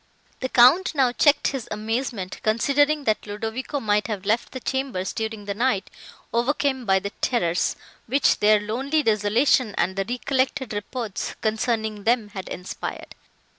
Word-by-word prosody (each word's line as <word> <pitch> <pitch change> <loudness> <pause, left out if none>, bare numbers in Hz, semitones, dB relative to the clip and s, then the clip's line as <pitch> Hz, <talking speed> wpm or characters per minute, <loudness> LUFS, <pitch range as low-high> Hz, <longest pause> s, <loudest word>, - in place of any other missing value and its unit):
The 260 - -3
Count 310 +10 +5
now 260 -3 +3
checked 290 +3 +3
his 270 -4 -5
amazement, 215 -2 -3
considering 285 +7 +2
that 215 -4 0
Ludovico 225 +7 -4
might 210 -3 +1
have 205 -3 -4
left 220 +3 0
the 260 - -6
chambers, 265 -9 -2
during 220 -2 -4
the 200 - -2
night, 215 -3 0 0.4
overcome 260 +1 0
by 190 -2 +4
the 200 +1 -3
terrors, 175 -9 +1 0.3
which 270 +4 +3
their 210 0 +5
lonely 265 +9 -1
desolation 220 +1 +2
and 190 - +1
the 195 0 -1
recollected 260 0 -1
reports, 210 0 -4
concerning 220 -1 -1
them, 225 -2 +1
had 190 -3 -7
inspired. 180 +1 -6
225 Hz, 145 wpm, -24 LUFS, 210-260 Hz, 0.4 s, Count